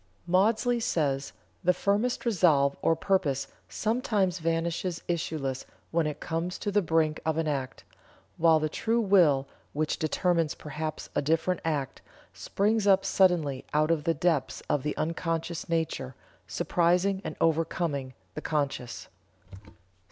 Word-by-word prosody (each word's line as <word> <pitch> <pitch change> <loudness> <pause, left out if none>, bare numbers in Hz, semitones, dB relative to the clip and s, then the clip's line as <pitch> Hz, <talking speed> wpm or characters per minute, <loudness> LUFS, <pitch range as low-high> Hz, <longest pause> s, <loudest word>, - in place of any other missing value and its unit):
Maudsley 220 +7 +2
says: 140 -10 -1 0.3
"The 180 0 +3
firmest 210 +6 0
resolve 160 -10 +3
or 165 - +3
purpose 160 -7 0 0.2
sometimes 210 -5 0
vanishes 165 +1 -1
issueless 155 -6 -2 0.3
when 165 -2 +1
it 150 - -4
comes 170 +3 -3
to 205 - -3
the 205 +1 +3
brink 160 -3 +1
of 160 -1 0
an 165 -1 0
act, 135 -4 -3 0.5
while 160 -1 +5
the 155 - 0
true 225 +9 0
will, 170 -11 +4 0.3
which 155 +1 -1
determines 165 0 +1
perhaps 155 +1 -6
a - - +1
different 165 +5 0
act, 145 -5 -2 0.3
springs 210 +1 0
up 195 -1 +5
suddenly 165 -8 +2
out 155 +2 +3
of 160 -2 0
the 165 -1 +2
depths 155 -7 0
of 145 - +1
the 150 +2 -3
unconscious 165 +1 -2
nature, 160 -6 -2 0.3
surprising 180 +3 +1
and - - -5
overcoming 160 -5 0 0.2
the - - -6
conscious." 140 -5 -3
165 Hz, 135 wpm, -28 LUFS, 150-185 Hz, 0.5 s, while